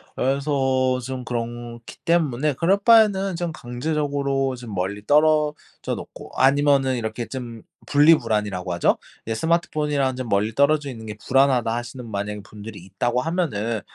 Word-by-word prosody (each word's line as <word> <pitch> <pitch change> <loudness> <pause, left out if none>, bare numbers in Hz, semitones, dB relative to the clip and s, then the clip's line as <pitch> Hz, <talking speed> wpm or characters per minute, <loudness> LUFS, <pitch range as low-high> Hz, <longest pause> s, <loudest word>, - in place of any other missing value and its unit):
그래서 130 -1 +1
좀 130 -1 -5
그렇기 120 0 -6
때문에 150 -4 +1
그럴 170 +8 +2
바에는 200 -3 +4
좀 170 0 -3
강제적으로 140 0 -2
좀 120 -4 -9
멀리 100 +3 -3
떨어져 150 +1 +1
놓고 - - -10
아니면은 135 -1 +3
이렇게 115 0 -4
좀 120 -4 -7 0.2
분리불안이라고 105 - +2
하죠? 85 - +2 0.3
이제 110 0 -2
"스마트폰이랑 150 -3 0
좀 130 -1 -5
멀리 105 +1 0
떨어져 145 0 +2
있는 115 -4 -8
게 105 -1 -6
불안하다." 130 -3 +3
하시는 120 0 -6
만약에 105 0 -4
분들이 105 +2 -10
있다고 100 +7 -2
하면은 115 - -1
130 Hz, 355 characters per minute, -23 LUFS, 115-150 Hz, 0.3 s, 바에는